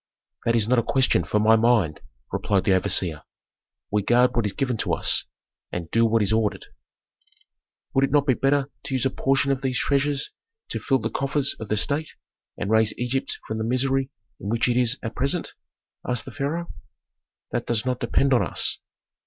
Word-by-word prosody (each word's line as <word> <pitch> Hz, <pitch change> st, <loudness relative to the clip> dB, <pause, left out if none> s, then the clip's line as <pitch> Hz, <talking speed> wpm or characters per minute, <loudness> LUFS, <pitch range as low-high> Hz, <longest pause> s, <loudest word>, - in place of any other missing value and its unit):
"That 115 Hz, -, +2 dB
is 110 Hz, -2 st, +2 dB
not 125 Hz, 0 st, +3 dB
a -, -, +3 dB
question 130 Hz, +3 st, +2 dB
for 105 Hz, -, 0 dB
my 110 Hz, +1 st, +5 dB
mind," 110 Hz, -9 st, +2 dB, 0.3 s
replied 100 Hz, -3 st, 0 dB
the 95 Hz, -, +3 dB
overseer. 90 Hz, -4 st, +1 dB, 0.7 s
"We 105 Hz, 0 st, +2 dB
guard 120 Hz, +5 st, +3 dB
what 115 Hz, -3 st, +1 dB
is 100 Hz, -, -4 dB
given 130 Hz, -4 st, -1 dB
to -, -, 0 dB
us, -, -, +1 dB, 0.5 s
and 85 Hz, -2 st, -5 dB
do 115 Hz, 0 st, +4 dB
what 115 Hz, -1 st, +2 dB
is 105 Hz, +2 st, +1 dB
ordered." 110 Hz, -2 st, 0 dB, 1.3 s
"Would 135 Hz, +1 st, +4 dB
it 135 Hz, -, -6 dB
not 145 Hz, -1 st, +3 dB
be 135 Hz, -, +4 dB
better 135 Hz, +2 st, +1 dB
to 140 Hz, -2 st, -2 dB
use 130 Hz, 0 st, +1 dB
a 135 Hz, -, +2 dB
portion 135 Hz, +1 st, +1 dB
of 135 Hz, -1 st, -1 dB
these 130 Hz, -2 st, 0 dB
treasures 140 Hz, 0 st, 0 dB, 0.4 s
to -, -, -2 dB
fill 135 Hz, -, +1 dB
the 110 Hz, -2 st, -3 dB
coffers 140 Hz, 0 st, 0 dB
of 110 Hz, -, -6 dB
the 105 Hz, -, +1 dB
state 145 Hz, +8 st, -1 dB, 0.4 s
and 100 Hz, -, -3 dB
raise 110 Hz, -1 st, +3 dB
Egypt 125 Hz, +2 st, -2 dB
from 110 Hz, 0 st, -3 dB
the -, -, -1 dB
misery 130 Hz, +3 st, +1 dB, 0.3 s
in 100 Hz, -, -5 dB
which 115 Hz, +1 st, +1 dB
it 120 Hz, -, +1 dB
is 125 Hz, +1 st, +2 dB
at 110 Hz, -, -4 dB
present?" 140 Hz, +6 st, -1 dB, 0.5 s
asked 125 Hz, -2 st, -2 dB
the -, -, -8 dB
pharaoh. 165 Hz, +5 st, -3 dB, 0.8 s
"That -, -, -2 dB
does 120 Hz, 0 st, 0 dB
not 125 Hz, -1 st, -1 dB
depend 135 Hz, -1 st, +2 dB
on 120 Hz, -, +4 dB
us." -, -, -1 dB
125 Hz, 195 wpm, -24 LUFS, 110-135 Hz, 1.3 s, my